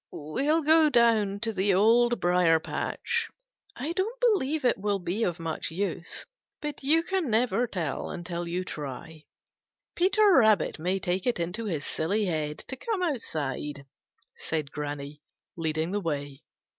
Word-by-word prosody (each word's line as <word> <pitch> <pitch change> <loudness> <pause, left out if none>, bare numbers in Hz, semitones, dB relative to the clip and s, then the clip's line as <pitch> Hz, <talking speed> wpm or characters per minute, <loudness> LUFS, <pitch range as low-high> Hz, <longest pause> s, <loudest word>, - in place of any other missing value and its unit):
"We'll 280 - 0
go 315 +1 +6
down 225 -6 +3
to 225 -1 -1
the 195 0 +2
Old 235 +4 +4
Briar 175 -2 +4
patch. 465 - -2 0.5
I 285 +6 -3
don't 400 +8 -2
believe 315 - +2
it 245 - +3
will 205 0 0
be 195 +4 -2
of 175 -3 -1
much 165 -1 -3
use, 175 0 -4 0.3
but 295 -1 -5
you 315 +4 +3 0.2
never 245 -2 +1
can - - -31
tell 155 -5 -3
until 175 0 -4
you 180 +2 -2
try. 155 +1 -7 0.7
Peter 395 +3 +4
Rabbit 220 - +4
may 180 +4 0
take 185 +1 -1
it 240 - +1
into 180 +7 -3
his 160 -8 -3
silly 205 +7 0
head 155 -4 -2
to 265 - -4
come 395 - -2
outside," 150 - -3 0.5
said 155 -3 -2
Granny, 145 0 -5 0.3
leading 160 0 -1
the 205 +1 -1
way. 145 -5 -4
195 Hz, 150 wpm, -28 LUFS, 160-255 Hz, 0.7 s, go